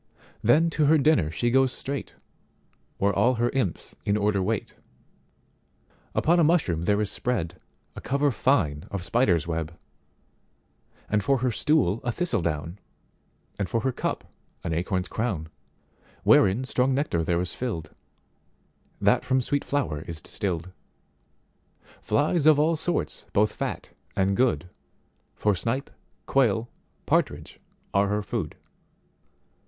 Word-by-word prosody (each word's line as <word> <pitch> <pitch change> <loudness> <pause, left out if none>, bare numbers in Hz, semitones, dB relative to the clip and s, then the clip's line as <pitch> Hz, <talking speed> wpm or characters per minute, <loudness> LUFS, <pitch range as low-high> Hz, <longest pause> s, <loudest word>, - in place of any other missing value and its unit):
Then 155 +9 +4
to 150 -1 +2
her 160 +2 +6
dinner 140 - +3
she 120 +10 0
goes 135 0 +4
straight, 140 +2 -5 0.8
Where 100 +1 +2
all 125 +1 +3
her 120 +1 +1
imps 110 -10 -2
in 100 +1 +1
order 105 -1 +1
wait. 105 +2 -2 1.4
Upon 170 +2 +3
a - - +5
mushroom 150 - +2
there 105 +2 +2
is 105 - -1
spreadA 110 -10 -2 0.5
cover 140 +1 +1
fine 85 - +1
of 100 -3 -4
spiders 95 - +2
web; 80 0 -4 1.3
And 105 -1 +1
for 135 +7 +3
her 125 - +2
stool 115 - +2
a 120 - 0
thistle 175 - -1
down; 80 +3 -3 0.8
And 100 -3 -1
for 115 - 0
her 130 - 0
cup - - -3 0.4
an 85 - -2
acorn's 90 +2 -1
crown, 95 -9 -2 0.7
Wherein 100 +6 +5
strong 130 0 +1
nectar 135 - 0
there 85 +1 +1
is 90 0 -3
filled, 85 -12 -4 1.1
That - - +3
from 130 +1 +2
sweet 140 +3 -1
flower 125 - -1
is 85 -2 -6
distilled. 90 0 -4 1.3
Flies 155 +1 +2
of 155 -2 +7
all 155 +3 +3
sorts 160 - -1
both 105 +1 +3
fat - - -4 0.2
and 95 +1 +2
good, 120 -7 +1 0.7
For 105 - +2
snipe, 115 +9 -2 0.3
quail, 120 -4 +2 0.4
partridge - - 0 0.3
are 100 +1 +3
her 105 +1 -1
food. 100 -8 -3
110 Hz, 135 wpm, -26 LUFS, 90-135 Hz, 1.4 s, of